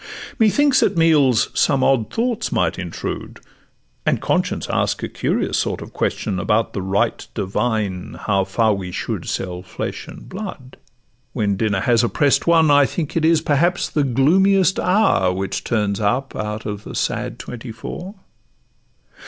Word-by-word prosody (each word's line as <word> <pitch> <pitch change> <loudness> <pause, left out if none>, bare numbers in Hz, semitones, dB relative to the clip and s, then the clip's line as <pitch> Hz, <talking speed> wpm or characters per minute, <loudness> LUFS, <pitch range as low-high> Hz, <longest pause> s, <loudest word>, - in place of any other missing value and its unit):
Methinks 260 +5 +4
at 190 - +1
meals 150 -8 +4
some 135 -2 +2
odd 125 -5 +2
thoughts 235 -1 -1
might 85 -3 0
intrude, 90 -2 -5 0.6
And - - +1
conscience - - -1
ask - - -1
a - - -1
curious - - -1
sort - - -1
of - - -10
question, 95 -3 -2
About 110 +3 0
the 100 - -3
right 100 +5 -1
divine 100 -2 -2
how 100 -2 +1
far 110 +3 +2
we 95 -2 -5
should - - -4
Sell 90 -1 -3
flesh 95 - -6
and - - -11
blood. 185 -10 -8 0.6
When 105 -5 0
dinner 100 -2 0
has 120 +2 +3
opprest 140 +6 +2
one, 165 -3 +5
I 145 -1 +5
think 155 -4 -4
it 165 - +1
is 160 0 +4
perhaps 165 +4 +1
the 150 - +1
gloomiest 185 +9 +3
hour 180 - +3
Which 95 +1 -3
turns 105 -3 0
up 125 +6 -1
out 105 0 -4
of 105 -1 -5
the - - -8
sad - - -2
twenty 120 0 -8
four. 180 - -7
120 Hz, 155 wpm, -20 LUFS, 100-165 Hz, 0.6 s, one